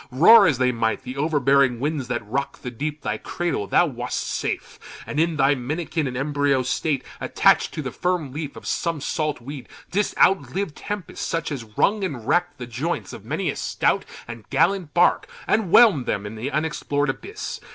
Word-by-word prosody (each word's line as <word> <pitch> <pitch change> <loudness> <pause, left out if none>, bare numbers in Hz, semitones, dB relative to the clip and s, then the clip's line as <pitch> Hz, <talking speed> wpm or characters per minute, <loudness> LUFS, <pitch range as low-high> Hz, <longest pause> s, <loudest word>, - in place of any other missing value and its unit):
Roar 190 - +7
as 145 -6 +2
they 125 0 +2
might, 115 -2 -1
the 125 0 -6
overbearing 140 -4 +2
winds 145 -1 -2
That 125 - -3
rock'd 135 +5 -3
the 125 - -4
deep, 150 +5 -4
thy 105 0 -2
cradle, 175 -12 -2
thou - - +4
wast 125 -5 -3
safe - - -4 0.3
And 150 - -3
in 165 0 +2
thy 140 0 +4
minikin 150 +4 -2
and 125 -1 -4
embryo 140 -1 +1
state, 140 +2 -1 0.2
Attach'd - - +3
to 155 - -3
the 130 - -4
firm 175 -6 -2
leaf 150 -1 -5
of - - -11
some 165 -3 -1
salt 150 -1 -2
weed, 135 +1 -8 0.2
Didst 205 +3 0
outlive 195 -2 +2
tempests, 205 +3 -6
such 165 -1 -2
as 135 -5 -4
wrung 210 0 +2
and 130 -11 -4
rack'd 175 +4 +1
The 125 - -6
joints 120 - -3
of - - -10
many - - -1
a - - -8
stout - - 0 0.2
and 115 -2 -9
gallant 190 -6 +1
bark, 180 - +3 0.2
And 220 -1 +2
whelm'd 190 - +6
them 100 - -1
in 105 - -6
the 115 +5 -4
unexplor'd 145 -2 -1
abyss. 415 - -7
145 Hz, 190 wpm, -23 LUFS, 125-170 Hz, 0.3 s, Roar